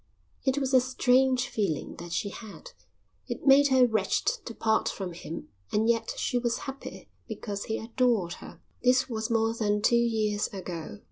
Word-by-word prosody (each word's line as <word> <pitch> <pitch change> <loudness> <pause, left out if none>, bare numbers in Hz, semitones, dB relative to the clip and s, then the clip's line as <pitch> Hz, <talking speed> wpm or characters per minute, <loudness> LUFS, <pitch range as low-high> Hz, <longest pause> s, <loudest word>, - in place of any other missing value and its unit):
It 265 0 +1
was 270 -1 -1
a 255 - +7
strange 255 0 +2
feeling 200 -11 -2
that 170 0 -8
she 185 +4 -1
had. 220 - -10 0.6
It - - -5
made 280 +1 +7
her 260 -2 +5
wretched 215 -5 0 0.2
to 230 - -7
part 220 0 +1
from 185 -3 -5
him 170 -1 -8 0.2
and 220 +2 +2
yet 230 -1 +1
she 245 - 0
was 240 -1 0
happy 270 0 -8 0.2
because 200 -2 -5
he 220 - -2
adored 225 -6 0
her. - - -11 0.2
This 255 +1 +3
was 220 -1 -3
more 225 -1 +2
than 210 -2 0
two 240 - +4
years 220 -3 +1
ago. 170 - -7
225 Hz, 175 wpm, -28 LUFS, 205-255 Hz, 0.6 s, a